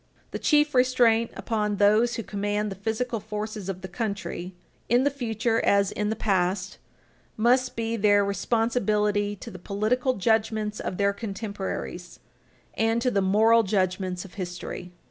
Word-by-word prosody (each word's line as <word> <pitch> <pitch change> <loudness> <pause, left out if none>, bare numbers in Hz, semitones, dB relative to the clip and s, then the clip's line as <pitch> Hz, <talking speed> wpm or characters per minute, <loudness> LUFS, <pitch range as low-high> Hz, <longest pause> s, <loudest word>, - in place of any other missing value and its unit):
The - - -4
chief 300 -1 +3
restraint 245 -3 +3
upon 210 -3 -1
those 215 +4 +3
who 230 - -4
command 205 +1 -2
the - - -5
physical 225 +4 -2
forces 210 -1 -5
of 185 -1 -4
the 190 - -6
country, 190 -3 -4 0.3
in 245 +2 +4
the 285 - +2
future 230 -3 -1
as 200 -1 +3
in 210 0 -2
the 220 - -1
past, 185 -2 0 0.6
must 250 +3 +2
be 230 0 -2
their 205 -2 +4
responsibility 210 -1 0
to 190 - -10
the 185 - -10
political 225 +8 0
judgments 215 0 0
of 180 - -4
their 200 0 +2
contemporaries 200 -4 -5 0.5
and 225 +1 +1
to 250 +1 +1
the 200 - +1
moral 220 +4 +5
judgments 185 -3 -1
of 185 - -13
history. 180 -1 -6
210 Hz, 150 wpm, -26 LUFS, 195-230 Hz, 0.6 s, moral